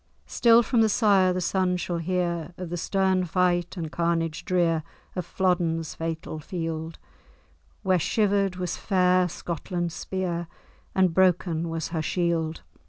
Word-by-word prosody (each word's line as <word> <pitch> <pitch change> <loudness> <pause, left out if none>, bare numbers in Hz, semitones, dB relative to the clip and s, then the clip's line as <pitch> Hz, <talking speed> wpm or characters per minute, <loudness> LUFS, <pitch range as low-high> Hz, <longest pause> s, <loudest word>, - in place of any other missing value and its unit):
Still 235 0 +5
from 230 +1 +2
the 220 - +4
sire 195 -4 +4
the 180 0 -1
son 180 0 +1
shall 175 -1 -3
hear 175 -1 -2
Of 180 -2 -6
the - - -1
stern 190 +1 +1
fight 175 +1 +1
and 160 -3 -4
carnage 165 -1 -1
drear 170 -3 +2 0.3
Of 180 -3 -3
Flodden's 170 -4 0
fatal 160 -1 -4
field, 165 0 -4 0.9
Where 185 -2 +3
shiver'd 200 0 +1
was 180 -2 -3
fair 185 -2 +2
Scotland's 175 +1 -4
spear, 175 -3 -3 0.5
And 185 -3 +3
broken 175 -2 +2
was 165 0 -3
her 165 -2 -2
shield! 165 -1 -1
175 Hz, 140 wpm, -26 LUFS, 165-185 Hz, 0.9 s, Still